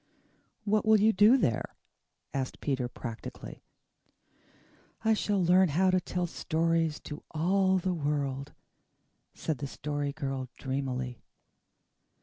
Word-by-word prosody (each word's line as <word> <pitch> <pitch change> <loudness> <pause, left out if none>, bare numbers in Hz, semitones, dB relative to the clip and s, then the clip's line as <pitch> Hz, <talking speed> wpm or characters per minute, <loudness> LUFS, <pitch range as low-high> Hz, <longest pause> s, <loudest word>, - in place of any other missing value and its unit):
"What 210 0 +2
will 220 -1 +5
you 220 +2 +4
do 210 +7 +6
there?" 120 - -1 0.6
asked 135 -1 -3
Peter 130 -4 -1
practically. 120 -2 -8 1.4
"I 220 - +5
shall 205 -2 0
learn 180 +1 +5
how 185 +6 +3
to 185 0 +2
tell 180 0 -2
stories 165 -1 0
to 150 - -8
all 190 +4 +2
the 185 0 0
world," 145 -3 -2 0.8
said 155 -3 -3
the 140 - -3
Story 145 0 -3
Girl 135 -4 -4
dreamily. 130 -2 -3
160 Hz, 120 wpm, -30 LUFS, 135-185 Hz, 1.4 s, do